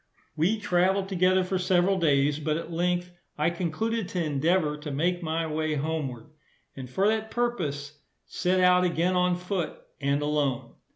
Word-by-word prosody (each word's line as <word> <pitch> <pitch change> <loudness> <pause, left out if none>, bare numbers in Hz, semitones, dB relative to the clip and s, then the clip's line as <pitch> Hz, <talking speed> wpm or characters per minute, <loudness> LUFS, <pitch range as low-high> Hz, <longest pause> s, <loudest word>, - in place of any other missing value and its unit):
We 180 +8 +2
traveled 190 0 +1
together 185 0 +3
for 185 0 -1
several 185 +1 +2
days, 145 -2 +2
but 155 0 -1
at 165 0 -6
length 175 +1 -1 0.3
I 155 +3 +2
concluded 185 +6 -2
to 180 -2 -1
endeavour 155 +1 +1
to 150 0 -7
make 175 +6 0
my 165 0 -1
way 155 0 -1
homeward; 145 -5 -3 0.4
and 130 -2 -8
for 190 +10 +1
that 220 0 0
purpose 155 -13 -2 0.3
set 185 +1 0
out 180 0 +5
again 175 +1 +1
on 180 0 +2
foot, 180 -2 -3 0.2
and 140 +1 +1
alone. 145 -4 -1
170 Hz, 160 wpm, -27 LUFS, 150-185 Hz, 0.4 s, out